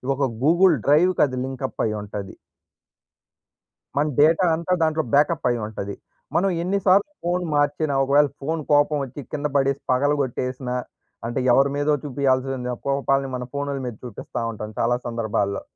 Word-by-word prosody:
ఒక 140 - -1 0.2
గూగుల్ 170 +3 +5
డ్రైవ్‌కి 165 +5 +4
అది 130 -1 -6
లింకప్ 130 0 -4
అయ్యింటది. 105 -2 -4 1.6
మన 145 +2 +2
డేటా 160 +5 +5
అంతా 170 +3 -1
దాంట్లో 160 0 +1
బ్యాకప్ 150 +2 +3
అయ్యి 120 -2 -1
ఉంటది. 100 -2 -6 0.4
మనం 195 +3 +3
ఎన్ని 195 +3 0
సార్లు 195 +7 +4
ఫోన్ 175 +1 0
మార్చినా, 145 0 +1
ఒకవేళ 145 +2 +4
ఫోన్ 160 +3 -2
కోపం 145 +1 +4
వచ్చి 135 +2 -7
కింద 150 0 -1
పడేసి 140 0 +1
పగలగొట్టేసినా 130 -2 -1 0.5
అంటే 120 +2 -2
ఎవరి 135 +3 +4
మీదో 145 +1 +1
చూపియాల్సిన 130 -2 -1 0.2
కోపాల్ని 135 0 +1
మన 125 - -4
ఫోన్‌ల 140 0 -2
మీద 120 - -5
చూపిస్తా 120 0 -6
ఉంటాం 110 -1 -7
చాలా 120 +1 +2
సందర్భాల్లో. 110 -4 -1
140 Hz, 140 wpm, -23 LUFS, 125-150 Hz, 1.6 s, గూగుల్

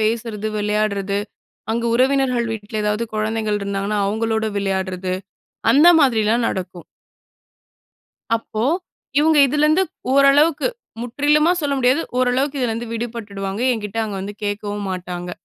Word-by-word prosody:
பேசுறது, 220 -1 -1
விளையாட்றது, 205 -1 0 0.5
அங்க 235 +1 -1
உறவினர்கள் 255 -2 +2
வீட்ல 215 0 -4
எதாவது 210 +2 0
குழந்தைகள் 215 -1 -1
இருந்தாங்கன்னா, 200 +1 -2
அவுங்களோட 220 +1 -1
விளையாட்றது, 190 -2 -2 0.6
அந்த 300 +5 +7
மாதிரில்லாம் 230 -3 +3
நடக்கும். 180 -2 -5 1.5
அப்போ, 225 0 -4 0.5
இவங்க 310 0 +4
இதிலருந்து 300 +6 +3 0.3
ஓரளவுக்கு, 280 - +4 0.3
முற்றிலுமா 295 +7 +2
சொல்ல 285 -2 0
முடியாது, 260 +5 +3 0.2
ஓரளவுக்கு 265 +3 +1
இதிலருந்து 235 -1 -2
விடுபட்டுடுவாங்க, 220 -3 -4
என்கிட்ட 215 -1 -4
அவங்க 210 -3 -4
வந்து 205 +1 -6
கேட்கவும் 205 0 -3
மாட்டாங்க. 180 -1 -5
220 Hz, 110 wpm, -20 LUFS, 205-255 Hz, 1.5 s, அந்த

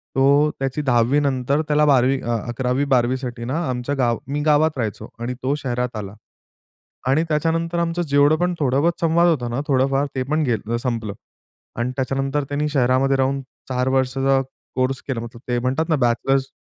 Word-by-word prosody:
तो 140 +3 +4
त्याची 135 +2 -2
10वी 125 +1 +3
नंतर 140 +1 0
त्याला 150 0 +3
12वी 135 -1 +3
अ, 120 -1 -1
11वी, 125 +3 -1
12वी 130 -1 +2
साठी 120 -2 -6
ना, 140 +7 -1
आमच्या 125 +3 -2
गाव 120 -3 +1
मी 145 +2 -2
गावात 155 -1 +3
राहायचो 110 -2 -4
आणि 120 +2 -3
तो 140 +3 +1
शहरात 125 -1 -2
आला. 100 0 -6 0.9
आणि 145 +5 +3
त्याच्यानंतर, 165 +2 0
आमचं 170 +1 -1
जेवढं 145 0 +4
पण, 180 +1 0
थोडं 135 -1 +2
बहुत 170 +1 +1
संवाद 170 +1 +3
होता 125 -7 0
ना 120 +4 -2
थोडंफार 135 +1 +2
ते 130 - 0
पण 155 0 +2
गेलं 115 -2 -1
संपलं. 115 -4 -3 0.7
आणि 125 +2 -1
त्याच्यानंतर 135 +2 -1
त्यांनी 150 +1 -1
शहरामध्ये 135 0 +2
राहून 135 +1 0 0.3
4 125 0 0
वर्षाचा 135 +1 +2 0.3
कोर्स 130 +1 0
केला, 120 -4 -2
मतलब 120 +1 -4
म्हणतात 135 +6 -1
ना, 160 - +3
बॅचलर्स. 135 +2 +1
135 Hz, 175 wpm, -21 LUFS, 125-145 Hz, 0.9 s, तो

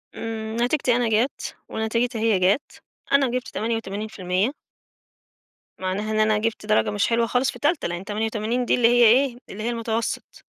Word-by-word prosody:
إمم، 220 0 -5
نتيجتي 250 -1 +2
أنا 240 -2 +1
جَت، 225 +5 0
ونتيجتها 230 +2 -1
هي 220 -4 +3
جَت، 195 +8 0 0.3
أنا 280 -1 +4
جِبت 255 0 -2
88%. 210 -2 -2 1.3
معناها 190 +3 -2
إن 215 - 0
أنا 215 0 +3
جِبت 220 0 -2
درجة 215 0 +2
مش 205 -1 +1
حلوة 230 0 +2
خالص 250 +3 +1
في - - -12
تالتة 295 +2 +1
لإن 175 +2 -5
88 220 +3 -1
دي - - +3
اللي 240 -2 +4
هي 240 0 +5
إيه؟ 245 +2 +4
اللي 215 +2 -6
هي 235 - 0
المتوسط. 230 -1 -3
225 Hz, 165 wpm, -24 LUFS, 215-240 Hz, 1.3 s, هي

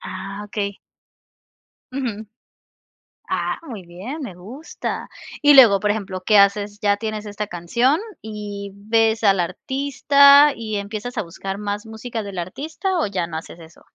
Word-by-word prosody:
Ah, 195 +2 -7
okey. 205 -2 -4 1.1
Ujú. 230 -5 -4 1.0
Ah, - - -1
muy 215 -7 -7
bien, 205 - -7
me 195 -10 -6
gusta. 240 - -6 0.3
Y 290 0 +7
luego, 225 -8 +8
por 210 0 +2
ejemplo, 195 -3 -4
¿qué 210 -2 +5
haces? 205 +1 +3
Ya 205 -1 +3
tienes 215 0 -5
esta 210 0 -5
canción 235 - +1 0.2
y 205 -2 -7
ves 220 +2 +1
al 195 -3 +4
artista 280 - +5
y, 215 -2 -4
¿empiezas 215 +4 -5
a - - 0
buscar 195 +3 -6
más 205 +1 -4
música 220 0 -6
del 200 -2 -8
artista 315 - -3
o 310 - +1
ya 180 -4 -2
no 160 - -8
haces 165 +1 -9
eso? 160 0 -15
210 Hz, 150 wpm, -21 LUFS, 200-245 Hz, 1.1 s, luego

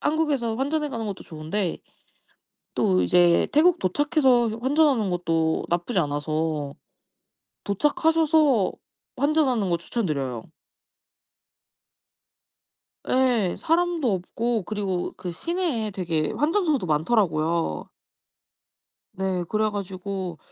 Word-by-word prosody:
한국에서 295 -7 0
환전해 295 +3 -1
가는 230 -4 -4
것도 200 - -5
좋은데 165 +4 -3 1.0
또 90 -1 +2
이제 170 - +4
태국 335 +4 +4
도착해서 255 - +2
환전하는 265 -6 +2
것도 165 -2 0
나쁘지 175 +5 0
않아서 150 -1 -2 0.9
도착하셔서 300 - +2 0.5
환전하는 265 - +2
거 170 - +1
추천드려요. 145 - -3 2.7
예 245 -8 +2
사람도 330 - +1
없고 225 +4 -2
그리고 195 -3 -3
그 180 -2 -5
시내에 320 - -2
되게 165 -5 -2
환전소도 310 - +1
많더라고요. 165 -1 0 1.3
네 190 -2 -2
그래 215 0 +1
가지고 190 -3 -5
205 Hz, 235 characters per minute, -24 LUFS, 170-285 Hz, 2.7 s, 이제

